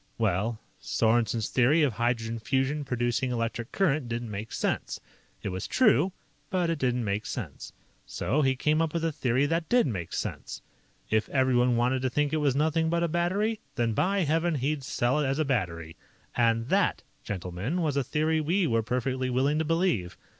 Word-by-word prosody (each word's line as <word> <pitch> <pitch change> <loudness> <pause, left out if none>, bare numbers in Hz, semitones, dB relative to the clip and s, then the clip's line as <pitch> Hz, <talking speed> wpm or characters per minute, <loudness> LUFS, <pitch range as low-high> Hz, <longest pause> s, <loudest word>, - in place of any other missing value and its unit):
"Well, 110 +1 0 0.2
Sorensen's 115 -1 +1
theory 140 +6 +4
of 135 -5 +2
hydrogen 115 0 -1
fusion 135 +5 0
producing 125 0 -1
electric 115 -1 -3
current 150 -9 +1
didn't 115 -1 -4
make 105 +2 -6
sense. - - -2 0.4
It - - -2
was 95 +1 -4
true, 195 - +3 0.4
but 180 -2 +1
it 165 - -2
didn't 125 -2 0
make 100 +1 -2
sense. - - -6 0.4
"So 150 - 0
he 135 -2 +2
came 150 +4 +1
up 165 0 -1
with 165 -1 0
a 165 - +1
theory 130 -1 +1
that 165 +2 -1
did 245 0 +4
make 95 - -3
sense. - - -5 0.5
If 110 0 +1
everyone 125 -2 +3
wanted 125 +2 +1
to 130 - 0
think 150 +3 0
it - - +2
was 145 -4 +1
'nothing 160 +2 +1
but 170 +1 +1
a - - +2
battery', 190 +7 0 0.2
then, 115 -1 0
by 195 - +1
Heaven, 165 +1 +1
he'd 140 +1 -1
sell 130 +2 0
it 145 - +1
as 135 +1 0
a 155 - +1
battery. 85 - -2 0.4
And 115 0 +2
that, - - +2 0.2
gentlemen, 95 - -3
was 150 -3 0
a 140 - +1
theory 155 +4 0
we 175 +5 +1
were 115 -6 +2
perfectly 130 +2 -1
willing 135 +5 +1
to 160 - 0
believe. 165 - 0
130 Hz, 185 wpm, -28 LUFS, 115-155 Hz, 0.5 s, theory